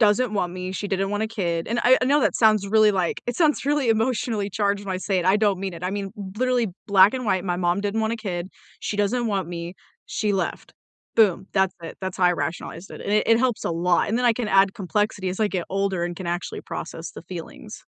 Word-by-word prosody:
doesn't 215 Hz, +1 st, +3 dB
want 180 Hz, -3 st, -1 dB
me, 185 Hz, 0 st, -5 dB
she 200 Hz, +2 st, -4 dB
didn't 195 Hz, 0 st, 0 dB
want 205 Hz, +1 st, -1 dB
a 220 Hz, -, -1 dB
kid, 175 Hz, -7 st, -2 dB
and 235 Hz, +2 st, -1 dB
I 255 Hz, +1 st, +7 dB
I -, -, +4 dB
know 285 Hz, +3 st, +3 dB
that -, -, +2 dB
sounds 215 Hz, -3 st, +4 dB
really, 215 Hz, +1 st, +5 dB
like, 185 Hz, -4 st, -1 dB
it 245 Hz, -, -2 dB
sounds 310 Hz, -5 st, +2 dB
really 290 Hz, -3 st, +1 dB
emotionally 225 Hz, -2 st, 0 dB
charged 205 Hz, 0 st, 0 dB
when 195 Hz, -, -3 dB
I -, -, -2 dB
say 190 Hz, 0 st, 0 dB
it. -, -, -4 dB
I 190 Hz, +2 st, +4 dB
don't 205 Hz, -3 st, +1 dB
mean 195 Hz, -1 st, -3 dB
it. 170 Hz, +1 st, -8 dB
I 185 Hz, -, -1 dB
mean, 200 Hz, -1 st, -3 dB, 0.3 s
literally 250 Hz, 0 st, +1 dB, 0.2 s
black 200 Hz, +2 st, +6 dB
and 255 Hz, -1 st, -3 dB
white, 185 Hz, -4 st, 0 dB
my 175 Hz, -2 st, -1 dB
mom 175 Hz, +1 st, +1 dB
didn't 205 Hz, +2 st, -1 dB
want 220 Hz, +1 st, 0 dB
a -, -, -1 dB
kid, 185 Hz, -5 st, -4 dB, 0.3 s
she 210 Hz, -, -3 dB
doesn't 225 Hz, +4 st, +1 dB
want 195 Hz, -2 st, -1 dB
me, 170 Hz, 0 st, -6 dB, 0.3 s
she 210 Hz, -1 st, -1 dB
left. 185 Hz, -3 st, -3 dB, 0.4 s
Boom! 195 Hz, -4 st, +3 dB
That's 190 Hz, -2 st, +2 dB
it. 165 Hz, -, -8 dB
That's 190 Hz, -1 st, -4 dB
how 185 Hz, -, +1 dB
I 180 Hz, -, +5 dB
rationalized 170 Hz, +1 st, -5 dB
it, -, -, -9 dB
and 205 Hz, -, -2 dB
it 210 Hz, -, +4 dB
and 230 Hz, -, +5 dB
it -, -, 0 dB
helps 250 Hz, -2 st, 0 dB
a -, -, 0 dB
lot, 175 Hz, +1 st, +1 dB
and 225 Hz, +3 st, 0 dB
then 250 Hz, -, 0 dB
I 240 Hz, -, +5 dB
can 225 Hz, -1 st, -3 dB
add 195 Hz, -1 st, +4 dB
complexity 195 Hz, 0 st, -1 dB
as 185 Hz, -, -4 dB
I 215 Hz, -, +4 dB
get 185 Hz, -4 st, -2 dB
older 195 Hz, -2 st, 0 dB
and 175 Hz, 0 st, -4 dB
can 185 Hz, -, -6 dB
actually 175 Hz, +1 st, -3 dB
process 165 Hz, 0 st, -6 dB
the -, -, -10 dB
feelings. 170 Hz, -1 st, -9 dB
200 Hz, 260 wpm, -24 LUFS, 185-220 Hz, 0.4 s, I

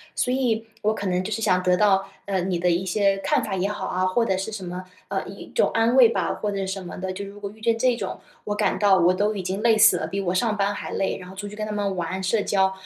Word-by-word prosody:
所 250 Hz, -, 0 dB
以 240 Hz, -4 st, +1 dB, 0.2 s
我 215 Hz, +1 st, +2 dB
可 200 Hz, -2 st, -4 dB
能 180 Hz, 0 st, 0 dB
就 215 Hz, -, -5 dB
是 225 Hz, -, -2 dB
想 185 Hz, -3 st, +2 dB
得 180 Hz, 0 st, +3 dB
到， 195 Hz, 0 st, +3 dB, 0.2 s
呃， 195 Hz, -2 st, -1 dB
你 180 Hz, -1 st, -1 dB
的 180 Hz, 0 st, +2 dB
一 175 Hz, +2 st, +1 dB
些 195 Hz, +1 st, +2 dB
看 -, -, +1 dB
法 200 Hz, -3 st, -3 dB
也 190 Hz, +2 st, 0 dB
好 210 Hz, -, -4 dB
啊， 185 Hz, +1 st, 0 dB
或 210 Hz, +6 st, +2 dB
者 190 Hz, -4 st, 0 dB
是 195 Hz, +3 st, -4 dB
什 210 Hz, -2 st, -6 dB
么， 180 Hz, +1 st, -6 dB, 0.2 s
呃， -, -, -3 dB
一 -, -, -10 dB
种 -, -, +3 dB
安 230 Hz, +2 st, +2 dB
慰 250 Hz, -3 st, +8 dB
吧， 230 Hz, -, -1 dB
或 210 Hz, -1 st, -3 dB
者 195 Hz, -1 st, -2 dB
什 195 Hz, 0 st, -3 dB
么 -, -, -7 dB
的， 185 Hz, 0 st, -3 dB
就 200 Hz, +2 st, -5 dB
如 200 Hz, +1 st, -11 dB
果 200 Hz, -1 st, -5 dB
遇 220 Hz, +2 st, -16 dB
见 230 Hz, +1 st, +2 dB
这 250 Hz, +1 st, +2 dB
种， -, -, -5 dB, 0.2 s
我 210 Hz, -, -2 dB
感 210 Hz, 0 st, 0 dB
到 200 Hz, -2 st, +5 dB
我 180 Hz, 0 st, +4 dB
都 205 Hz, +3 st, +1 dB
已 195 Hz, -, -4 dB
经 190 Hz, +4 st, -3 dB
累 230 Hz, -2 st, +5 dB
死 215 Hz, -, +6 dB
了， -, -, -3 dB
比 195 Hz, 0 st, -3 dB
我 180 Hz, -2 st, -1 dB
上 215 Hz, +3 st, +1 dB
班 200 Hz, 0 st, +1 dB
还 -, -, -6 dB
累， 195 Hz, -, -1 dB
然 180 Hz, -, -10 dB
后 190 Hz, -, -11 dB
出 205 Hz, +1 st, -6 dB
去 210 Hz, -, -9 dB
跟 215 Hz, 0 st, -3 dB
他 215 Hz, -, -5 dB
们 200 Hz, -2 st, -1 dB
玩 180 Hz, +2 st, -3 dB
社 205 Hz, +3 st, +1 dB
交， 190 Hz, -1 st, +2 dB
200 Hz, 320 characters per minute, -24 LUFS, 185-215 Hz, 0.2 s, 慰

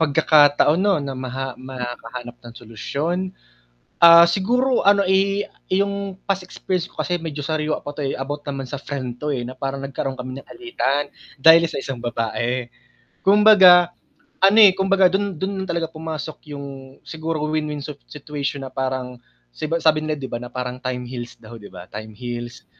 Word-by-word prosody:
pagkakataon 150 Hz, +1 st, +4 dB
'no, 200 Hz, -2 st, +3 dB
na 140 Hz, -1 st, -4 dB
maha 130 Hz, 0 st, -5 dB
makahanap 120 Hz, -1 st, -7 dB
ng 120 Hz, -1 st, -12 dB
solusyon? 140 Hz, +9 st, -3 dB, 0.9 s
Ah, 170 Hz, 0 st, +10 dB
siguro 245 Hz, +9 st, +1 dB
ano, 200 Hz, 0 st, +5 dB
i 195 Hz, +1 st, +2 dB, 0.3 s
'yong 200 Hz, 0 st, -1 dB
past 195 Hz, -1 st, 0 dB
experience 180 Hz, -1 st, -3 dB
ko -, -, -17 dB
kasi 180 Hz, -, -1 dB
medyo 160 Hz, -3 st, -6 dB
sariwa 155 Hz, 0 st, -1 dB
pa 145 Hz, -, -5 dB
'to, 150 Hz, -, -4 dB
eh, 135 Hz, -, -2 dB
about 145 Hz, +2 st, -5 dB
naman 135 Hz, -2 st, -4 dB
sa 140 Hz, +2 st, -6 dB
friend 130 Hz, -4 st, -6 dB
'to, 150 Hz, 0 st, -2 dB
eh, 130 Hz, -4 st, -2 dB
na 130 Hz, -, -8 dB
parang 135 Hz, +1 st, -4 dB
nagkaroon 135 Hz, -1 st, -4 dB
kami 130 Hz, +1 st, -6 dB
ng -, -, -17 dB
alitan, 250 Hz, -, -2 dB, 0.3 s
dahil 160 Hz, +4 st, +7 dB
sa 160 Hz, -, -5 dB
isang 135 Hz, -2 st, -5 dB
babae. 120 Hz, +1 st, -2 dB, 0.6 s
Kumbaga, 190 Hz, -4 st, +7 dB, 0.5 s
ano, 195 Hz, +3 st, +6 dB
eh, 205 Hz, -3 st, +9 dB
kumbaga, 190 Hz, -1 st, +4 dB
dun 195 Hz, -2 st, -1 dB
dun 190 Hz, +2 st, -3 dB
yun 190 Hz, -, -11 dB
talaga 170 Hz, -1 st, -1 dB
pumasok 155 Hz, -1 st, -7 dB
yung 135 Hz, -2 st, -9 dB
siguro 160 Hz, 0 st, -4 dB
win-win 150 Hz, -1 st, -2 dB
sit 145 Hz, -1 st, -8 dB
situation 145 Hz, -1 st, -5 dB
na 130 Hz, -, -7 dB
parang 130 Hz, -1 st, -3 dB, 0.4 s
si -, -, -7 dB
ba 165 Hz, +2 st, 0 dB
sabi 155 Hz, -1 st, +3 dB
nila, 155 Hz, 0 st, -2 dB
'di 130 Hz, -, -5 dB
ba, -, -, -1 dB
na 125 Hz, -, -7 dB
parang 125 Hz, -1 st, -4 dB
"time 125 Hz, -1 st, -4 dB
heals" 120 Hz, -1 st, -7 dB
daw, 115 Hz, +1 st, -11 dB
'di 105 Hz, -2 st, -12 dB
ba, 90 Hz, -, -11 dB
"time 110 Hz, +1 st, -8 dB
heals." 120 Hz, 0 st, -7 dB
145 Hz, 180 wpm, -21 LUFS, 130-175 Hz, 0.9 s, Ah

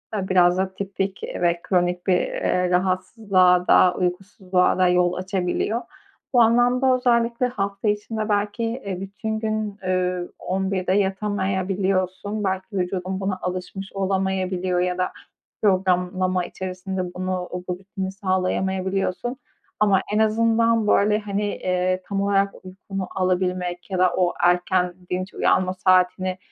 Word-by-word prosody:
biraz 185 Hz, -3 st, +3 dB
da 190 Hz, 0 st, -1 dB
tipik 195 Hz, 0 st, -3 dB
ve 175 Hz, -1 st, 0 dB
kronik 180 Hz, -1 st, 0 dB
bir, 180 Hz, -1 st, +4 dB
eee, 180 Hz, 0 st, 0 dB
rahatsızlığa 185 Hz, 0 st, +2 dB
da, 180 Hz, -1 st, +6 dB
uykusuzluğa 185 Hz, 0 st, 0 dB
da 185 Hz, -1 st, +4 dB
yol 180 Hz, 0 st, +3 dB
açabiliyor. 185 Hz, +5 st, -1 dB, 0.5 s
Bu 245 Hz, -, +6 dB
anlamda 245 Hz, +3 st, +4 dB
özellikle 240 Hz, -1 st, +2 dB
hafta 200 Hz, -3 st, -3 dB
içinde 215 Hz, +1 st, -1 dB
belki, 205 Hz, +3 st, 0 dB
eee, 225 Hz, -6 st, -3 dB
bütün 220 Hz, +3 st, -4 dB
gün, 215 Hz, -2 st, -2 dB
eee, 180 Hz, -1 st, 0 dB
23.00'de 190 Hz, 0 st, -1 dB
yatamayabiliyorsun, 195 Hz, 0 st, -1 dB
belki 190 Hz, -1 st, -1 dB
vücudun 185 Hz, +1 st, -2 dB
buna 190 Hz, -1 st, -2 dB
alışmış 185 Hz, +2 st, -5 dB
olamayabiliyor 190 Hz, -2 st, -1 dB
ya 180 Hz, 0 st, 0 dB
da 185 Hz, -, +1 dB, 0.5 s
programlama 185 Hz, -2 st, +1 dB
içerisinde 185 Hz, 0 st, -5 dB
bunu, 185 Hz, 0 st, -2 dB
o 180 Hz, 0 st, -5 dB
rutini 190 Hz, +1 st, -4 dB
sağlayamayabiliyorsun. 190 Hz, +3 st, -1 dB, 0.4 s
Ama 200 Hz, -3 st, +4 dB
en 210 Hz, -, +2 dB
azından 225 Hz, 0 st, +3 dB
böyle, 210 Hz, +1 st, +3 dB
hani, 205 Hz, -1 st, -2 dB
eee, 185 Hz, -2 st, -1 dB
tam 200 Hz, -1 st, -1 dB
olarak 200 Hz, 0 st, +2 dB
uykunu 190 Hz, +1 st, -6 dB
alabilmek 180 Hz, 0 st, -1 dB
ya 185 Hz, -, -1 dB
da 185 Hz, -1 st, +4 dB
o 180 Hz, -1 st, +2 dB
erken, 180 Hz, 0 st, +2 dB, 0.2 s
dinç 185 Hz, +1 st, -3 dB
uyanma 185 Hz, 0 st, +2 dB
saatini 185 Hz, 0 st, +2 dB
190 Hz, 125 wpm, -23 LUFS, 180-205 Hz, 0.5 s, da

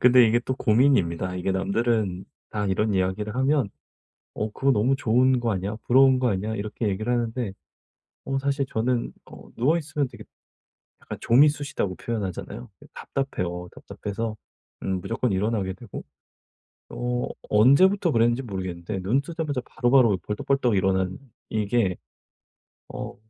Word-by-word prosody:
근데 125 Hz, -1 st, +7 dB
이게 115 Hz, +2 st, +3 dB
또 130 Hz, +2 st, -3 dB
고민입니다. 105 Hz, -, +2 dB
이게 95 Hz, +1 st, -1 dB
남들은 100 Hz, 0 st, 0 dB, 0.3 s
다 105 Hz, -1 st, -2 dB
이런 100 Hz, +2 st, +1 dB
이야기를 95 Hz, +4 st, -1 dB
하면 135 Hz, -3 st, +2 dB, 0.7 s
"어 110 Hz, 0 st, -3 dB
그거 135 Hz, +5 st, +1 dB
너무 125 Hz, +4 st, +2 dB
좋은 130 Hz, +1 st, +3 dB
거 120 Hz, -1 st, 0 dB
아니야? 100 Hz, +2 st, -3 dB
부러운 130 Hz, +1 st, +5 dB
거 125 Hz, -, +2 dB
아니야?" 105 Hz, +2 st, -2 dB
이렇게 105 Hz, +1 st, -3 dB
얘기를 110 Hz, +5 st, -2 dB
하는데 120 Hz, -3 st, -1 dB, 0.7 s
어 135 Hz, 0 st, -1 dB
사실 140 Hz, 0 st, 0 dB
저는 120 Hz, 0 st, -1 dB
어 -, -, -13 dB
누워 145 Hz, +8 st, +2 dB
있으면 150 Hz, -3 st, -2 dB
되게 -, -, -11 dB, 0.8 s
약간 -, -, -7 dB
"좀이 135 Hz, +6 st, +6 dB
쑤시다."고 140 Hz, -10 st, -3 dB
표현하잖아요. 95 Hz, -, -5 dB, 0.2 s
답답해요. 90 Hz, -10 st, -4 dB
답답해서 110 Hz, +2 st, -5 dB, 0.5 s
음 95 Hz, -1 st, -1 dB
무조건 115 Hz, +3 st, -1 dB
일어나게 100 Hz, -1 st, 0 dB
되고 115 Hz, -3 st, -9 dB, 0.9 s
어 125 Hz, 0 st, -2 dB, 0.2 s
언제부터 160 Hz, -, +5 dB
그랬는지 120 Hz, +1 st, +2 dB
모르겠는데 95 Hz, -4 st, -5 dB
눈 115 Hz, +9 st, +1 dB
뜨자마자 155 Hz, -4 st, -3 dB
바로바로 120 Hz, -5 st, +3 dB
벌떡벌떡 120 Hz, +2 st, 0 dB
일어나는 95 Hz, -1 st, +1 dB, 0.3 s
이게 105 Hz, -3 st, +1 dB, 0.9 s
어 -, -, -7 dB
115 Hz, 335 characters per minute, -25 LUFS, 95-130 Hz, 0.9 s, 근데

